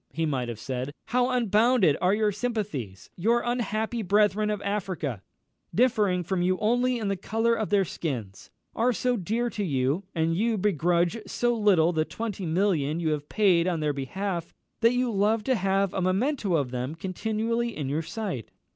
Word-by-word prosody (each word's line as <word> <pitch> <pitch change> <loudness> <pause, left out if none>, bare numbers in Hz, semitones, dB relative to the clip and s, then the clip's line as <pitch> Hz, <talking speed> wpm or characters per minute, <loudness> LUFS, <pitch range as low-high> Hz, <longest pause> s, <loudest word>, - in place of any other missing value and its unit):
he 160 +5 -2
might 130 -5 -1
have 115 - -5
said, 130 +4 -4 0.2
"how 250 +1 +2
unbounded 230 - +3
are 185 +2 +3
your 215 -1 +2
sympathies! 200 - -4
Your 230 +7 +2
unhappy 235 -1 -1
brethren 210 +1 +2
of 210 -1 -1
Africa, 185 - -3 0.5
differing 210 -7 +2
from 180 +1 -1
you 185 +1 +2
only 245 +4 +1
in 220 -3 -3
the 195 - 0
colour 225 +5 0
of 220 -2 -1
their 200 -2 +3
skins, 120 - -5 0.3
are 245 +2 +2
so 250 +4 0
dear 225 +4 -1
to 210 - -3
you, 140 0 0
and 165 0 +1
you 220 +4 +1
begrudge 175 - +1
so 240 0 0
little 185 -6 +3
the 155 -1 +2
twenty 205 0 -5
millions 165 -3 +1
you 160 - +1
have 150 -1 -3
paid 185 -5 +3
on 175 -3 0
their 150 -1 0
behalf, 170 +5 -4 0.2
that 230 +1 +4
you 250 -1 +1
love 210 +2 +1
to 260 - +1
have 195 -2 +1
a 190 - -1
memento 195 - +1
of 140 -5 0
them 125 +4 -3
continually 220 +6 -2
in 145 -3 -3
your 145 +4 -1
sight. 185 - -5
195 Hz, 180 wpm, -27 LUFS, 160-225 Hz, 0.5 s, that